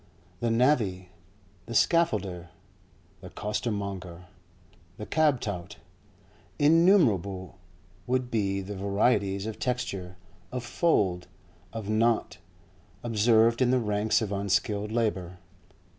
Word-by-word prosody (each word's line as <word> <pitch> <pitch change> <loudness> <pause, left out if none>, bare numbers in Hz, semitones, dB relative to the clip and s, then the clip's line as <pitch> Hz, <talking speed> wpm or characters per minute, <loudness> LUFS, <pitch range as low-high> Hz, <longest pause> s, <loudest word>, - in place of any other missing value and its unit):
The 120 - 0
navvy, 115 -7 +1 0.6
the 115 - -6
scaffolder, 100 - +1 0.7
the 95 +1 -10
costermonger, 100 -5 -4 0.7
the 105 - -6
cab 150 -2 +2
tout—innumerable 105 - 0 0.5
would 125 0 -1
be 100 -3 0
the 100 +2 -7
varieties 100 0 +1
of 110 -1 -6
texture, 100 -8 -3 0.4
of 125 -1 -4
fold, 100 - +1 0.4
of 110 -3 -6
knot, 110 -2 +1 0.6
observed 115 +1 +3
in 125 - +4
the 130 - +3
ranks 105 -1 +1
of 105 - -4
unskilled 100 +1 -1
labour. 95 -6 -1
105 Hz, 100 wpm, -27 LUFS, 95-120 Hz, 0.7 s, in